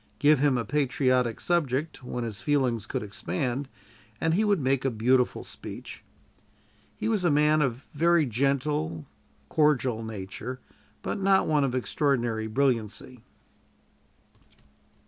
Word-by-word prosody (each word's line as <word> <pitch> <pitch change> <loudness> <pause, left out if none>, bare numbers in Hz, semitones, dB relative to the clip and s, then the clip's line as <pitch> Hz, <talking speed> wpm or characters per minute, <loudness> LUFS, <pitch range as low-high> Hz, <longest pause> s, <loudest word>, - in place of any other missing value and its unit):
Give 150 -1 +4
him 140 -2 +3
a 115 - -2
patriotic 130 -3 +1
subject, 150 -4 -1
where 125 -1 -4
his 115 -1 -4
feelings 130 -7 0
could - - -3
expand, 120 +7 -3 0.5
and 160 0 +1
he 205 +6 +2
would 205 -3 +2
make 135 -1 +1
a 135 - +2
beautiful 125 +2 +1
speech. - - -9 0.9
He - - -2
was 215 -4 +1
a 175 - +3
man 150 +1 +4
of 130 -2 -1
very 165 +1 +3
gentle, 125 - -1 0.4
cordial 130 -7 +2
nature, 110 +4 -6 0.4
but - - -3
not 195 0 +3
one 150 -2 +2
of 130 -2 0
extraordinary 120 -4 0
brilliancy. 125 0 -1
130 Hz, 125 wpm, -27 LUFS, 120-150 Hz, 0.9 s, Give